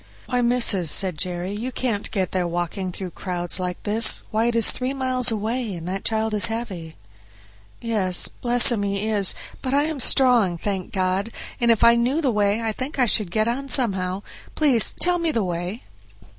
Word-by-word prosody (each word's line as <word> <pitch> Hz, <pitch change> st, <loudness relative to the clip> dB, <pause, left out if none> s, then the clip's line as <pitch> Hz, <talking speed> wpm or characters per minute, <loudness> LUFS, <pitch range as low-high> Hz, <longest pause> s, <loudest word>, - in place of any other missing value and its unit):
"Why, 250 Hz, 0 st, -1 dB
missis," 235 Hz, -8 st, +2 dB
said 185 Hz, +2 st, +1 dB
Jerry, 180 Hz, +3 st, -4 dB
"you 225 Hz, +5 st, -5 dB
can't 230 Hz, -5 st, -3 dB
get 190 Hz, -3 st, -3 dB
there 180 Hz, -2 st, -2 dB
walking 175 Hz, +2 st, -4 dB
through 185 Hz, 0 st, -7 dB
crowds 175 Hz, +1 st, -3 dB
like 180 Hz, -1 st, -5 dB
this! 220 Hz, +1 st, +4 dB
why, 220 Hz, +1 st, 0 dB
it 240 Hz, 0 st, -1 dB
is 230 Hz, -2 st, +5 dB
three 260 Hz, +2 st, -4 dB
miles 255 Hz, -2 st, +2 dB
away, 225 Hz, 0 st, -2 dB
and 170 Hz, 0 st, -8 dB
that 190 Hz, +1 st, -5 dB
child 220 Hz, 0 st, 0 dB
is 210 Hz, -, +4 dB
heavy." 195 Hz, -9 st, -6 dB, 0.8 s
"Yes, 205 Hz, -6 st, +3 dB
bless 245 Hz, 0 st, +3 dB
him, 225 Hz, -4 st, -1 dB
he 200 Hz, +1 st, -3 dB
is; 205 Hz, -3 st, +3 dB, 0.3 s
but 265 Hz, 0 st, -2 dB
I 285 Hz, -, +2 dB
am 310 Hz, -2 st, -4 dB
strong, 240 Hz, -10 st, +2 dB
thank 190 Hz, 0 st, -4 dB
God, 190 Hz, +2 st, -1 dB, 0.3 s
and 235 Hz, -2 st, +1 dB
if 230 Hz, -2 st, +3 dB
I 235 Hz, 0 st, +6 dB
knew 250 Hz, +6 st, 0 dB
the 280 Hz, -6 st, 0 dB
way 210 Hz, +1 st, 0 dB
I 225 Hz, -, -1 dB
think 260 Hz, +7 st, -6 dB
I 255 Hz, -, +3 dB
should 210 Hz, -4 st, +3 dB
get 215 Hz, +4 st, -1 dB
on 270 Hz, +4 st, -3 dB
somehow; 195 Hz, -7 st, 0 dB, 0.3 s
please 270 Hz, -8 st, +4 dB
tell 355 Hz, 0 st, +2 dB
me 335 Hz, -1 st, -1 dB
the 230 Hz, -7 st, -1 dB
way." 180 Hz, +4 st, -5 dB
215 Hz, 195 wpm, -22 LUFS, 185-245 Hz, 0.8 s, I